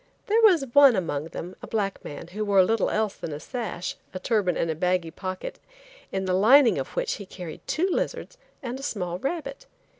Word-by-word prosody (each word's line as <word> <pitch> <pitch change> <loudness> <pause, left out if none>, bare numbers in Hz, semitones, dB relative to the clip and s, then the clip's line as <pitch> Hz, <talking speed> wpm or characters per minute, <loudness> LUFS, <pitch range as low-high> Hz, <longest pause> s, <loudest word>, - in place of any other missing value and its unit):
There 445 +3 +3
was 365 -10 +5
one 280 -4 +8
among 155 -6 -2
them, 175 +2 -7
a - - -8
black 200 -3 -2
man, 165 +3 -8
who 210 +4 -3
wore 200 -2 +5
little 220 +2 +1
else 215 -2 0
than 160 - -6
a 145 - -5
sash, 220 - -4 0.2
a - - -3
turban 190 -3 +1
and 165 - 0
a - - -3
baggy 180 0 0
pocket, 185 +2 -6 0.5
in 190 0 -2
the 185 - 0
lining 235 +7 +6
of - - -6
which - - -1
he 200 - -8
carried 175 -4 -8
two 350 +4 +1
lizards 390 - -2 0.3
and 255 +1 -4
a - - -8
small 180 -9 -3
rabbit. 275 - -4
200 Hz, 205 wpm, -26 LUFS, 180-265 Hz, 0.5 s, one